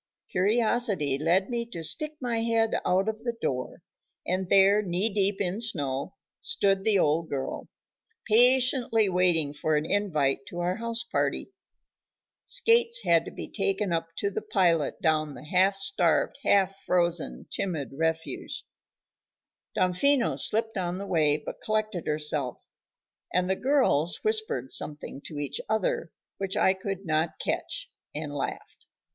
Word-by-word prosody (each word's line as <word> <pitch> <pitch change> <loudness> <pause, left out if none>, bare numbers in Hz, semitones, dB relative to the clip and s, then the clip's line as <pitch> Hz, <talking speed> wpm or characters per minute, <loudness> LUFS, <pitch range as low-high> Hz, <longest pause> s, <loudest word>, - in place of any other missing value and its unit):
Curiosity 205 - +1
led 175 +5 +2
me 235 -1 -1
to 170 -8 -7
stick 305 - 0
my 240 -3 -2
head 225 -1 +1
out 185 +3 +1
of 220 +1 -3
the 235 -1 -3
door, 125 -1 -4 0.4
and 185 0 -2
there, 200 +2 +5
knee 195 +2 +2
deep 200 -1 +2
in 195 +2 -2
snow, 140 - -1 0.2
stood 195 - 0
the 215 -1 +3
old 160 -1 +1
girl, 135 -2 -4 0.6
patiently 245 -1 +4
waiting 175 -5 +2
for 155 +1 -1
an 150 +1 0
invite 160 -8 +1
to 175 - -9
our 175 +1 -1
house 230 0 -2
party. 235 - -2 0.9
Skates 470 0 +3
had 165 -1 +3
to - - -6
be - - -7
taken 195 -2 -1
up 165 0 -1
to 200 - -1
pilot 175 -7 +1
down 155 -3 +1
the - - -11
half 190 +5 +3
starved, 195 - +1
half 195 -1 +2
frozen, 175 -2 -1
timid 160 -8 -3
refugee. 160 +2 -3 1.1
Damfino 235 +9 +2
slipped 225 0 +4
on 180 0 -2
the 200 - -5
way 155 -6 +2
but - - -9
collected 215 -5 -2
herself, 150 -4 0 0.7
and 180 +1 +1
the 190 - +1
"girls" 250 - +2
whispered 435 - -1
something 145 -2 -2
to 150 - -7
each 145 -2 -3
other, 210 -6 -1 0.3
which 195 -1 -2
I 190 - +4
could 195 0 -6
not 160 0 0
catch, - - -3 0.3
and 150 -1 -4
laughed. 140 - -6
190 Hz, 140 wpm, -27 LUFS, 160-220 Hz, 1.1 s, there